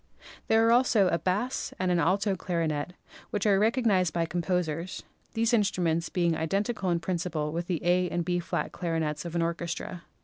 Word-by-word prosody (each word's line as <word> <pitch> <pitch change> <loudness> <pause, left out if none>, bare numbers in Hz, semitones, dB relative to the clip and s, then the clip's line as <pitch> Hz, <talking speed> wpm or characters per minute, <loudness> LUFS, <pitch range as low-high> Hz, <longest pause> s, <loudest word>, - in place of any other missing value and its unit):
There 225 0 +4
are 230 - +4
also 235 -6 +4
a 170 - +1
bass 205 +10 -1
and 185 -1 0
an 175 - +2
alto 195 +4 +2
clarinet 165 -3 -2 0.4
which 205 -1 -2
are 200 -2 +4
recognised 210 -6 +2
by 170 -1 +1
composers, 175 0 -2 0.3
these 225 +1 +2
instru 205 -6 +2
ments 165 0 0
being 170 -2 +1
identical 195 +5 -1
in 170 -1 +1
principle 165 -3 -2
with 170 +2 -3
the 175 -3 -2
A 180 0 +3
and 175 0 -2
B^ 175 0 0 0.3
clarinets 160 -3 -2
of 170 0 -5
an 170 - +2
orchestra. 170 +1 -4
180 Hz, 175 wpm, -28 LUFS, 165-195 Hz, 0.4 s, There